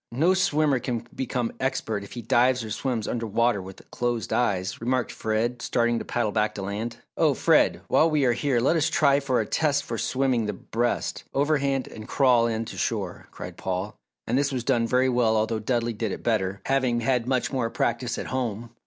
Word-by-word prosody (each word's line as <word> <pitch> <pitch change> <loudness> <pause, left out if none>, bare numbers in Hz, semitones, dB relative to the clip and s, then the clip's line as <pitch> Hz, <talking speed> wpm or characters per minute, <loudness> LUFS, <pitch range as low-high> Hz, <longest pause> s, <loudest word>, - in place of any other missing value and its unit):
No 160 +10 +3
swimmer 155 -7 +2
can 120 -1 -3
become 125 -3 -2
expert 110 -5 -1
if 100 - -11
he 120 - -6
dives 125 +1 +3
or 110 - -7
swims 115 0 -2
under 115 -1 -2
water 115 0 +1
with 95 0 -11
closed 120 -2 -2
eyes," 95 -5 0
remarked 125 0 0
Fred, 115 +3 -1
starting 120 -1 +1
to - - -6
paddle 120 -3 -1
back 105 0 0
to 100 - -5
land. 105 +4 -4 0.2
"Oh - - +3
Fred, - - +3
while 165 - +4
we 150 -3 +2
are 120 - +4
here 130 0 +1
let 135 +8 +2
us 160 -2 +2
try 140 -2 +4
for 135 -3 0
a 110 - 0
test 145 +3 +1
for 115 -2 -4
swimming 130 -4 +1
the 105 - -2
breast, 120 +5 -2
overhand, 140 -2 +1
and 110 -1 -10
crawl, 125 -4 +4
in 115 0 -2
to - - -8
shore," - - -3
cried - - -9
Paul, 95 +3 -3 0.3
and 125 +4 +1
this 140 0 +1
was 130 -3 -2
done 120 -3 +2
very 125 +2 +3
well 120 -3 +2
although 110 +1 0
Dudley 120 +1 -1
did 110 -1 -3
it - - -6
better, 100 -4 0
having 130 -3 +1
had 125 0 +1
much 130 -1 0
more 125 -4 0
practice 120 +1 -1
at - - -4
home. 120 -3 -3
120 Hz, 205 wpm, -25 LUFS, 110-130 Hz, 0.3 s, while